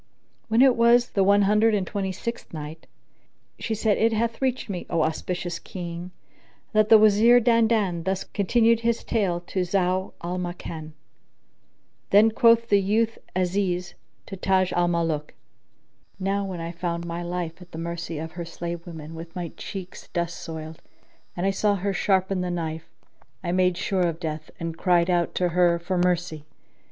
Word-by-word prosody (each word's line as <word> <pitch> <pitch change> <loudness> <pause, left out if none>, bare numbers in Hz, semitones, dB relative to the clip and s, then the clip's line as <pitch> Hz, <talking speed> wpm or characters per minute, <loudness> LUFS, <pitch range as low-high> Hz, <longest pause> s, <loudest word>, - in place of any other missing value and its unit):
When 230 +3 +4
it 260 -2 +5
was 235 +1 +4
the 195 - +2
One 200 +1 +5
Hundred 210 +2 +4
and 195 -2 0
Twenty 195 0 -3
sixth 235 +6 -6
Night, 155 0 -8 0.7
She 225 - -2
said, 215 -1 +1
It 225 0 +3
hath 230 +2 -1
reached 260 -1 0
me, 185 -4 -5
O 165 -2 +1
auspicious 175 +2 -3
King, 175 -1 -7 0.6
that 215 0 +3
the 225 - +9
Wazir 215 +3 +6
Dandan 225 -6 +2
thus 190 +1 -1
continued 230 +3 +2
his 235 0 0
tale 190 -6 0
to 180 +2 -4
Zau 185 +1 0
al 180 +1 -3
Makan: 165 -3 -6 1.2
Then 215 +3 +6
quoth 230 0 +4
the 200 -1 +4
youth 220 +3 +1 0.2
Aziz 180 -1 0 0.3
to 195 - -7
Taj 190 0 +1
al 175 0 +2
Muluk, 165 -3 -1 0.8
Now 195 +1 0
when 185 -3 -5
I 165 0 -4
found 170 0 -3
my 170 0 -4
life 175 0 -4
at 180 0 -14
the - - -8
mercy 170 -1 -4
of 160 +1 -5
her 175 0 -6
slave 170 +1 -6
women 160 -2 -8
with 165 +1 -9
my 175 -2 -4
cheeks 185 -2 -8
dust 170 -1 -3
soiled, 160 -1 -7 0.6
and 175 - -1
I 195 - +3
saw 205 +1 +1
her 200 +1 -2
sharpen 190 0 +1
the 180 - -2
knife, 165 -2 -4 0.5
I 175 - -1
made 180 -1 +2
sure 190 -1 -1
of 165 -1 -3
death 155 -2 -5
and 165 -1 -4
cried 175 -1 +3
out 175 -1 0
to 180 -1 +1
her 175 0 +3
for 180 +2 -2
mercy. 175 -4 0
180 Hz, 170 wpm, -25 LUFS, 170-205 Hz, 1.2 s, the